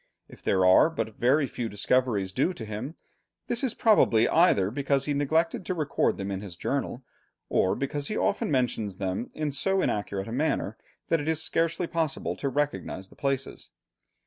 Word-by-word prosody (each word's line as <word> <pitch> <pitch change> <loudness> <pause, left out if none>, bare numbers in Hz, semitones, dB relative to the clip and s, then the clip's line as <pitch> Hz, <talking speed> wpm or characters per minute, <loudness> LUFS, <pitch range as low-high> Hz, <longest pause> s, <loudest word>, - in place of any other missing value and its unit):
If - - -15
there 95 -1 +2
are 95 - +6
but 110 -10 -4
very 140 +5 +3
few 120 -3 -4
discoveries 105 -2 0
due 140 - +1
to 115 - -7
him, 110 +9 -6 0.5
this 240 +3 -2
is 250 -3 0
probably 120 - +4
either 105 - +4
because 140 +1 0
he 145 - 0
neglected 160 +5 +1
to 185 - -1
record 155 -4 0
them 100 0 -4
in 95 0 -3
his 95 -4 -8
journal, 135 +5 -3 0.5
or 95 - +2
because 140 +1 -2
he 215 - -2
often 200 - 0
mentions 115 -8 0
them 95 +4 -3
in 155 -1 -2
so 190 +8 +1
inaccurate 100 - -1
a - - -6
manner 125 -5 -1 0.3
that 165 -2 +2
it 145 - -6
is 160 0 +1
scarcely 165 +2 0
possible 165 -2 -2
to 140 - -2
recognize 140 -9 -2
the - - -18
places. 135 -1 -3
135 Hz, 180 wpm, -27 LUFS, 105-160 Hz, 0.5 s, are